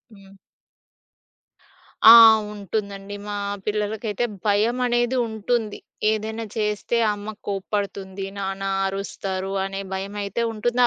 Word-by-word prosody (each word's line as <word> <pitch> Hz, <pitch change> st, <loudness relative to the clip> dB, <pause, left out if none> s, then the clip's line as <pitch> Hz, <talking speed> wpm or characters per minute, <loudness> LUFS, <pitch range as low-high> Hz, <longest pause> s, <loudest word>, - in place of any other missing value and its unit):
హ్మ్. 195 Hz, -1 st, -17 dB, 1.8 s
ఆ! -, -, +13 dB, 0.4 s
ఉంటుందండి, 200 Hz, 0 st, -5 dB
మా 210 Hz, -, -5 dB, 0.3 s
పిల్లలకైతే 210 Hz, +1 st, -1 dB, 0.2 s
భయమనేది 240 Hz, +4 st, +1 dB
ఉంటుంది. 220 Hz, 0 st, -2 dB, 0.3 s
ఏదైనా 220 Hz, +1 st, -3 dB
చేస్తే, 210 Hz, +2 st, -1 dB, 0.2 s
అమ్మ 205 Hz, +1 st, -6 dB, 0.2 s
కోప్పడుతుంది. 195 Hz, -1 st, -3 dB
నాన్న 195 Hz, 0 st, -4 dB, 0.2 s
అరుస్తారు 195 Hz, -1 st, -4 dB
అనే 195 Hz, 0 st, -4 dB
భయమయితే 200 Hz, +3 st, -3 dB
ఉంటుంది. 240 Hz, +3 st, -1 dB
205 Hz, 90 wpm, -23 LUFS, 195-220 Hz, 1.8 s, ఆ